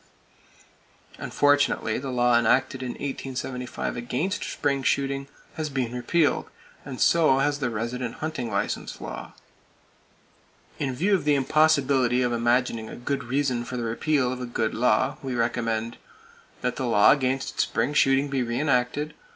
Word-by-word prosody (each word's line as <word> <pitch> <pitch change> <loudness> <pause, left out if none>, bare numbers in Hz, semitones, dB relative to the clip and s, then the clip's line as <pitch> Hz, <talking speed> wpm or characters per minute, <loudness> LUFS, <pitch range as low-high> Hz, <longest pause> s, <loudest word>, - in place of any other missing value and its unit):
Unfortunately 145 -6 +2
the 135 +1 -5
law 120 -1 +3
enacted 125 +4 +2
in 125 -1 -4
1875 130 -2 -4
against 130 +11 -2
spring 140 -1 -1
shooting 140 +1 0 0.3
has 155 -1 -2
been 130 -4 -2
repealed, 145 +6 +1 0.3
and 130 -3 -7
so 160 -5 +4
has 145 +1 +1
the 125 -3 -1
resident 120 +2 -3
hunting 155 -7 -4
license 100 -1 -3
law 65 0 -7 1.5
(1911). 140 - -1
In 130 - -4
view 190 +10 +1
of 185 -6 +2
the 150 0 +3
impossibility 135 -3 +3
of 120 -1 0
imagining 120 -1 0
a - - -8
good 135 +1 -3
reason 130 -1 0
for 125 +1 -6
the 120 - -2
repeal 125 +3 0
of 125 - -7
a 125 - -4
good 110 -2 -1
law, 115 -2 +2
we 130 -2 -4
recommend: 115 -1 -1 0.6
That 125 -1 -2
the 130 - -2
law 105 -3 +6
against 135 -1 0
spring 145 - 0
shooting 135 0 +3
be 135 -2 -1
re 120 0 -2
enacted. 145 +1 0
130 Hz, 150 wpm, -25 LUFS, 120-140 Hz, 1.5 s, law